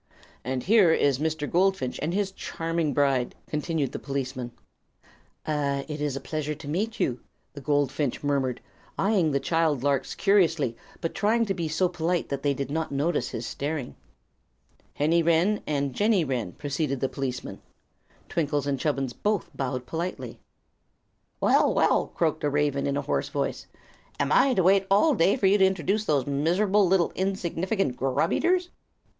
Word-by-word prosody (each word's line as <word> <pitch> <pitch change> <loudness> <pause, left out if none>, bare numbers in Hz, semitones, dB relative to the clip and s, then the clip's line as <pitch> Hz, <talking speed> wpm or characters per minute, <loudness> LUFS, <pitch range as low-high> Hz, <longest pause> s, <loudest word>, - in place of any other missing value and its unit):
"And 130 0 -3
here 200 -4 +5
is 140 -4 +2
Mr. 155 -1 -1
Goldfinch 180 -8 +1
and 155 +3 -1
his 195 +1 -1
charming 165 -4 -2
bride," 135 -3 +1
continued 150 -2 -2
the - - -5
policeman. 130 -3 -4 0.9
"Ah, 140 -2 -1
it 150 -1 -5
is 145 -2 -1
a - - -3
pleasure 150 +1 -3
to 140 - -11
meet 205 +9 -2
you," 125 -1 0 0.3
the 140 - -9
goldfinch 145 -1 0
murmured, 135 -3 0 0.4
eyeing 195 -5 +2
the 140 -1 +1
child 155 -2 +1
larks 140 -2 0
curiously, 165 - +2 0.3
but 165 - -2
trying 225 +3 +2
to 195 - -1
be 170 -3 -3
so 160 +4 +1
polite 175 0 -1
that 140 -1 -3
they 140 -1 +1
would 140 +1 -4
not 160 0 -2
notice 140 -2 0
his 115 - -5
staring. 145 - -4 1.0
"Henny 160 +4 +2
Wren 170 +6 +2
and 140 -3 -1
Jenny 205 - +2
Wren," 125 -9 -3
proceeded 140 -1 -2
the 135 - 0
policeman. 130 -8 -5 0.7
Twinkle 145 -3 -1
and 140 -2 -1
Chubbins 135 -4 -1
both 210 - -1
bowed 130 -2 -3
politely. 160 -5 -5 1.0
"Well, - - +4
well!" - - +3
croaked 160 -2 -1
a 145 - +2
raven, 145 -1 0
in 140 0 0
a 145 - -2
hoarse 140 - -1
voice, - - -3 0.5
"am - - 0
I 270 -2 +4
to 185 - +3
wait 195 +2 +4
all 210 +11 +4
day 200 +1 +3
while 195 -6 +3
you 205 - +4
introduce 190 +2 +2
those 145 -7 +1
miserable 180 +8 +2
little 180 -1 +2
insignificant 190 - -1
grub 135 +5 0
eaters?" 355 +1 +1
150 Hz, 160 wpm, -26 LUFS, 140-185 Hz, 1.0 s, here